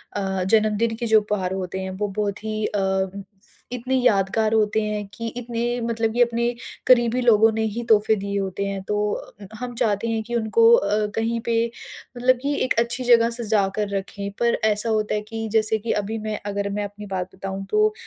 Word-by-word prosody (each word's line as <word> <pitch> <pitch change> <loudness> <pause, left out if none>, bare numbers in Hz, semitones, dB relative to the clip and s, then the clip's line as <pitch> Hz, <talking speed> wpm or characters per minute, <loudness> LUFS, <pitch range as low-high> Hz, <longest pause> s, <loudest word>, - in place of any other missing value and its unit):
अ, 190 -2 -1
जन्मदिन 215 +2 +2
के 235 +1 -4
जो 220 -1 +5
उपहार 190 -3 -2
होते 190 0 -4
हैं। 190 - -4
वो 205 +2 -2
बहुत 205 +1 -3
ही 215 0 -2
अम 190 -1 -1 0.5
इतने 250 +2 -2
यादगार 220 -2 +2
होते 220 0 +2
हैं, 210 -1 -2
कि 230 0 -5
इतने 240 0 -2
मतलब 225 -1 -1
ये 245 - +6
अपने 235 0 0 0.4
करीबी 245 0 +4
लोगों 225 -2 +5
ने 220 - -1
ही 235 +1 -3
तोहफे 220 0 +4
दिए 200 0 -3
होते 195 +1 -3
हैं। 195 -1 -3
तो 210 +1 -1
अ, 200 0 -8
हम 245 -1 -5
चाहते 220 -1 0
हैं 225 -1 0
कि 240 +2 -4
उनको 235 - +4
अ, 215 - +1
कहीं 230 +1 0
पे 230 -1 +1 0.6
मतलब 255 +1 +4
कि 285 +2 0
एक - - +1
अच्छी 235 +2 -1
जगह 235 -1 +5
सजा 220 -4 0
कर 210 -1 0
रखें। 200 +1 -5
पर 235 0 +2
ऐसा 210 +2 0
होता 215 -1 0
है 210 - -1
कि 225 0 -4
जैसे 220 0 +3
कि 225 +2 -3
अभी 220 +3 -4
मैं 215 -1 -4
अगर 200 0 -2
मैं 205 +1 -2
अपनी 205 +1 -7
बात 185 0 -4
बताऊँ 195 0 -5
तो, 425 0 +3
215 Hz, 205 wpm, -23 LUFS, 200-235 Hz, 0.6 s, ये